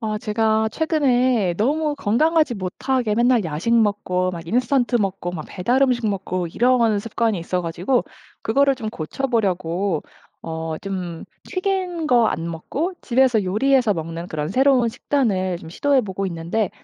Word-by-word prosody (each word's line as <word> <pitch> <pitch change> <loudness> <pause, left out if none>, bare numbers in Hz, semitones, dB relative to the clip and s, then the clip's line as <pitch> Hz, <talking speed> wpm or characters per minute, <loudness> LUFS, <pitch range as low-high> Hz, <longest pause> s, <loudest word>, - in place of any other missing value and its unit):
아 215 -1 -2
제가 220 0 +1
최근에 255 - +2
너무 295 - +1
건강하지 300 +5 +2
못하게 215 +5 -1
맨날 240 -1 +3
야식 160 +8 -2
먹고 200 -5 +1
막 170 -2 -7
인스턴트 250 - +1
먹고 195 -4 -2
막 160 -4 -6
배달 240 +8 0
음식 245 -4 +2
먹고 185 -3 -2
이런 235 +1 +2
습관이 225 -1 -1
있어 180 +2 -2
가지고 175 +9 0 0.4
그거를 275 +4 +3
좀 235 -4 -5
고쳐보려고 190 - -1 0.4
어 160 -1 -4
좀 180 -4 -5 0.2
튀긴 370 -3 -2
거 240 -4 +5
안 165 +1 -2
먹고 290 - -3
집에서 245 -5 +2
요리해서 235 +3 +2
먹는 165 +1 -5
그런 150 -3 -3
새로운 255 +3 +3
식단을 195 -9 0
좀 160 - -11
시도해 280 +9 +2
보고 195 -3 -4
있는데 175 +4 -2
220 Hz, 315 characters per minute, -22 LUFS, 180-255 Hz, 0.4 s, 거